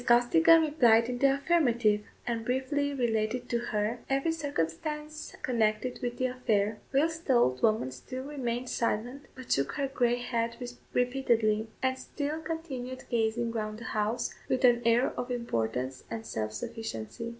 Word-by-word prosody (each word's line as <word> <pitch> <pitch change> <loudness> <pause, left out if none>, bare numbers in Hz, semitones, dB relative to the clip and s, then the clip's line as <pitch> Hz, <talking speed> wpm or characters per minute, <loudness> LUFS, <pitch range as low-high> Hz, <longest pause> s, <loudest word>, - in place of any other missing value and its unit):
Costigan 325 +7 +6
replied 240 -7 +4
in 245 0 -3
the 275 0 +4
affirmative, 245 -9 +2 0.2
and 230 -2 -2
briefly 265 +4 0
related 240 -2 0
to 235 - +1
her 220 0 -1
every 275 +4 +1
circumstance 300 - -3
connected 230 0 0
with 245 0 -3
the 255 - 0
affair, 220 -5 0
whilst 320 +4 +1
the 265 - +4
old 130 - +3
woman 215 -12 +2
still 255 - -7
remained 255 -4 -3
silent, 245 +4 -2
but 260 -1 -9
shook 140 0 +1
her 280 -2 -1
grey 245 -3 +2
head 235 -1 -2 0.3
repeatedly; 235 -4 +2 0.2
and 260 0 +1
still 295 +4 -4
continued 280 -6 -5
gazing 230 0 +1
round 215 -2 -3
the 235 - -9
house 215 +3 -1 0.2
with 255 0 +3
an 240 -1 +5
air 235 +2 +4
of 245 - -4
importance 130 - -2
and 225 0 -5
self 110 -1 -3
sufficiency. 225 - -5
245 Hz, 150 wpm, -30 LUFS, 220-270 Hz, 0.3 s, Costigan